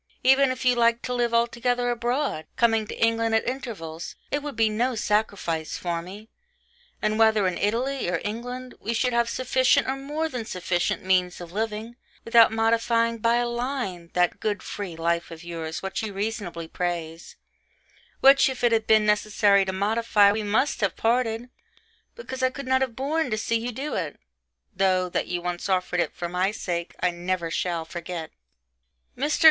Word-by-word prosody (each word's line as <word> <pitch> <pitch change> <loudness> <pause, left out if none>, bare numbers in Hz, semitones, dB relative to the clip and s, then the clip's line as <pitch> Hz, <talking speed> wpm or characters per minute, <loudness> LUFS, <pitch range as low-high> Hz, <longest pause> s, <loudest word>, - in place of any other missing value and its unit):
Even 265 +1 +5
if 255 0 -4
you 250 - +5
liked 235 0 +2
to 250 - -2
live 240 -1 +1
altogether 240 +1 +1
abroad, 240 - -1
coming 225 -2 +2
to - - -7
England 230 0 +2
at 225 - +1
intervals, 200 - -5 0.2
it 290 - 0
would 295 -1 -6
be 225 -1 +3
no 235 +4 0
sacrifice 200 -7 -1
for 170 -2 -2
me 200 +5 -10 0.8
and 215 +1 +1
whether 220 -2 +4
in 180 - -1
Italy 245 +3 -1
or 170 -2 0
England, 245 +4 -5
we 230 +3 -2
should 250 +2 +1
have 235 0 +2
sufficient 255 0 +2
or 265 - 0
more 295 +4 -3
than 250 -7 -4
sufficient 180 -3 -1
means 180 -1 +2
of 175 -1 -9
living, 220 +3 -4 0.3
without 230 -1 +6
modifying 230 +1 +1
by 230 +2 +3
a 240 0 +1
line 240 -8 -3
that 180 0 +1
'good 205 -2 -2
free 195 -5 -6
life' 170 +1 -1
of 165 0 -10
yours 165 -1 -5
which 190 0 -3
you 220 -2 -4
reasonably 195 -5 -4
praise 170 -1 -4 0.9
which, 275 0 +7
if 260 -1 -6
it 240 - +4
had 225 -1 +1
been 215 -1 +5
necessary 210 -1 +3
to 190 - -2
modify, 205 +1 +3
we 215 +2 -1
must 215 +7 0
have 200 -4 +1
parted,... 235 0 0 0.6
because 265 - -7
I 260 - +3
could 275 +1 -8
not 260 0 +2
have 255 -4 -1
borne 295 +3 -1
to 215 - -1
see 230 +1 0
you 240 +2 -3
do 275 +6 -4
it; - - -3 0.6
though, 185 -1 +2
that - - -1
you 175 -1 -3
once 175 +2 -3
offered 180 -1 0
it - - -1
for 175 - -3
my 180 +2 0
sake, 175 -5 -4
I 180 - +2
never 175 -1 -2
shall 170 -1 -1
forget. 170 -1 -6 0.8
Mr. 295 +5 0
220 Hz, 180 wpm, -25 LUFS, 180-245 Hz, 0.9 s, which